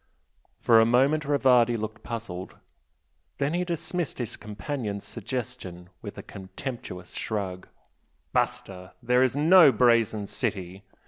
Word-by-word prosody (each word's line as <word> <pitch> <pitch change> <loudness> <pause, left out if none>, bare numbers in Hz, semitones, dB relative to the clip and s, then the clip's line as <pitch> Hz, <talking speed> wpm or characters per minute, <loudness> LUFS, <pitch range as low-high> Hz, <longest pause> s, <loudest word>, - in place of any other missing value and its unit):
For 115 -2 +5
a 115 - +6
moment 135 +6 +3
Rivardi 125 -4 +3
looked 110 0 -6
puzzled, 110 -6 -6 0.8
then 140 +2 -1
he 175 +1 0
dismissed 175 -1 -3
his 120 -4 -4
companion's 105 -1 -5
suggestion 110 -7 -6
with - - -8
a - - -7
contemptuous 95 -1 -8
shrug. 95 -4 -4 0.7
"Basta! 90 -1 -2
There 125 +1 +3
is 130 -1 +2
no 160 +1 +7
'Brazen 115 -3 +2
City'! 95 -1 -4
115 Hz, 120 wpm, -26 LUFS, 100-135 Hz, 0.8 s, no